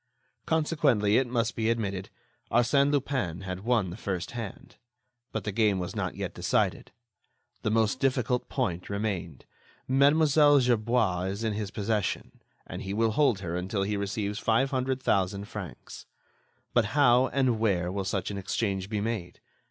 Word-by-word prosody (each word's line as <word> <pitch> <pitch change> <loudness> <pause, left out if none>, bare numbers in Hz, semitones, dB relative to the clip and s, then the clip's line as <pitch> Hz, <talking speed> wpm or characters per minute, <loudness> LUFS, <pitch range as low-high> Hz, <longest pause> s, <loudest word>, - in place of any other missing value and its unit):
Consequently, 150 -10 +2
it 130 - 0
must 120 -1 -1
be 110 0 0
admitted, 100 -5 -2 0.4
Arsène 140 +4 +3
Lupin 130 - -1
had 90 -1 -5
won 110 -4 +1
the - - -6
first 95 -4 -4
hand. 115 -4 -8 0.5
But 110 - -3
the 105 - -2
game 105 -1 +2
was 90 -1 -4
not - - -2
yet - - -4
decided. - - 0 0.7
The - - 0
most 110 -1 +1
difficult 125 -2 0
point 90 -10 -2
remained. 100 -8 -3 0.4
Mlle. 140 +4 +4 0.3
Gerbois 115 -6 +1
is 100 +4 -4
in 110 -1 0
his 105 -1 -3
possession, 105 -1 -2 0.2
and - - -7
he 95 +1 -4
will 115 0 +2
hold 115 -5 +2
her 85 -2 -3
until 95 +3 -1
he 105 +1 -1
receives 100 +1 -2
five 115 +5 +2
hundred 130 0 0
thousand 100 +1 +1
francs. - - -9 0.7
But 120 -3 +4
how 130 -2 +5
and 130 -5 +1
where 90 -5 +1
will 100 0 -2
such 95 +1 -2
an 100 - -4
exchange 95 -1 -2
be 105 -2 -1
made? 105 -5 -4
110 Hz, 160 wpm, -28 LUFS, 95-120 Hz, 0.7 s, how